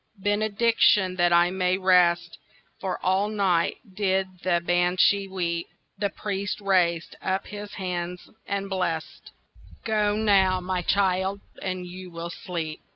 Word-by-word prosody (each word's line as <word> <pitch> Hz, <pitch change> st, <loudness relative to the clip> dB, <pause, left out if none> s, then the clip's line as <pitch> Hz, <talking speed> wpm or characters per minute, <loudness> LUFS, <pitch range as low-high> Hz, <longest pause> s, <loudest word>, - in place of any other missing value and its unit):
"Benediction, 205 Hz, -1 st, +2 dB
that 175 Hz, -1 st, +3 dB
I 175 Hz, +1 st, +4 dB
may 185 Hz, -1 st, +1 dB
rest, 175 Hz, -3 st, +3 dB, 0.4 s
For 190 Hz, -2 st, -3 dB
all 190 Hz, +2 st, +2 dB
night 190 Hz, -5 st, +1 dB, 0.2 s
did 190 Hz, -2 st, -1 dB
the 175 Hz, -1 st, +2 dB
Banshee 180 Hz, +3 st, +3 dB
weep." 170 Hz, -3 st, -2 dB, 0.3 s
The 200 Hz, -1 st, 0 dB
priest 200 Hz, +1 st, -4 dB
raised 180 Hz, -4 st, +1 dB
up 190 Hz, +1 st, -1 dB
his 205 Hz, 0 st, -8 dB
hands 180 Hz, -1 st, -4 dB, 0.2 s
and 200 Hz, -1 st, -2 dB
blest— 180 Hz, -4 st, -3 dB, 0.6 s
"Go 210 Hz, -2 st, +1 dB
now, 195 Hz, -4 st, +3 dB
my 185 Hz, 0 st, -2 dB
child, 190 Hz, +1 st, +1 dB, 0.2 s
and 185 Hz, -1 st, -3 dB
you 180 Hz, +1 st, -9 dB
will 170 Hz, 0 st, -6 dB
sleep." 165 Hz, -3 st, -5 dB
185 Hz, 130 wpm, -25 LUFS, 175-200 Hz, 0.6 s, I